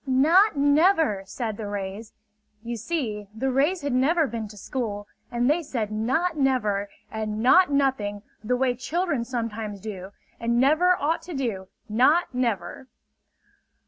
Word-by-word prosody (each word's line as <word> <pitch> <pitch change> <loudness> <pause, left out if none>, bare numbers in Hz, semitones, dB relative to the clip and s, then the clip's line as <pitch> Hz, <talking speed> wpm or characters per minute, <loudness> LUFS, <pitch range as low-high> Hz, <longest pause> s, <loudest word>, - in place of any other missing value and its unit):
"Not 320 +9 +4
never!" 295 - +3
said 220 +1 -4
the 215 - -5
rays. 205 +2 -5 0.5
You 235 0 -4
see, 225 -5 -3
the 265 +4 -1
rays 295 +8 +1
had 285 -2 -1
never 310 +6 +3
been 230 -4 -4
to 210 0 -13
school; 205 -3 -4 0.2
and 240 +1 0
they 305 +5 +2
said 230 -8 -3
"not 260 +12 0
never" 215 -8 0 0.2
and 215 -1 -3
"not 360 +8 +6
nothing" 260 -8 0 0.2
the 250 +3 0
way 255 -1 +2
children 295 +2 -1
sometimes 225 -4 -4
do 190 -2 -7 0.3
and 235 +1 +1
never 320 +7 +4
ought 315 +4 0
to 350 -3 -8
do, 220 -8 -3 0.2
not 260 +10 +3
never! 235 -2 -2
245 Hz, 145 wpm, -25 LUFS, 215-290 Hz, 0.5 s, not